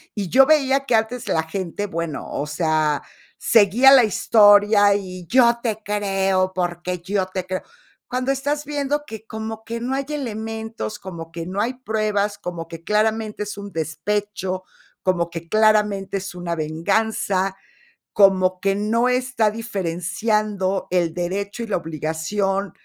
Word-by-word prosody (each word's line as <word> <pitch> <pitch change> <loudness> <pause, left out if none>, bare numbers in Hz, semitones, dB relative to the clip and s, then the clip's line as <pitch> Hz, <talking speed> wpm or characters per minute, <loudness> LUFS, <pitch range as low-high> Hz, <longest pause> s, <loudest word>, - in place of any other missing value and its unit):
Y 205 -3 -2
yo 265 +6 +6
veía 275 -2 +3
que 245 - +2
antes 225 +3 -1
la 160 - +1
gente, 185 +4 -4
bueno, 165 -4 -4
o 145 - -2
sea, 155 -1 +1 0.4
seguía 230 +5 +5
la 260 -3 +8
historia 205 -1 +5
y 185 -3 -5
yo 235 0 +4
te 220 -3 -2
creo, 195 -2 0
porque 175 0 -2
yo 190 +1 -1
te 185 -1 -4
creo. 185 0 -3 0.5
Cuando 255 +1 -1
estás 285 +2 -2
viendo 290 0 -1
que 220 -3 -9
como 220 0 -6
que 230 +1 -5
no 245 +3 -2
hay 275 0 -2
elementos, 225 -5 -5
como 170 -4 -8
que 165 0 -6
no 190 +3 -2
hay 250 +3 -1
pruebas, 215 -4 -1
como 170 -2 -6
que 165 0 -10
claramente 215 +1 0
es 205 0 -7
un 200 -1 -7
despecho, 185 +4 -3 0.4
como 175 -2 +1
que 170 0 -7
claramente 210 -3 +2
es 195 -1 -6
una 175 -1 -4
venganza, 190 +4 0 0.6
como 185 -2 +4
que 195 0 +1
no 230 +4 +1
está 250 -4 +1
diferenciando 200 -1 -1
el 175 -3 +1
derecho 200 +6 -3
y - - -6
la 210 - 0
obligación, 170 +5 -2
205 Hz, 150 wpm, -22 LUFS, 180-220 Hz, 0.6 s, la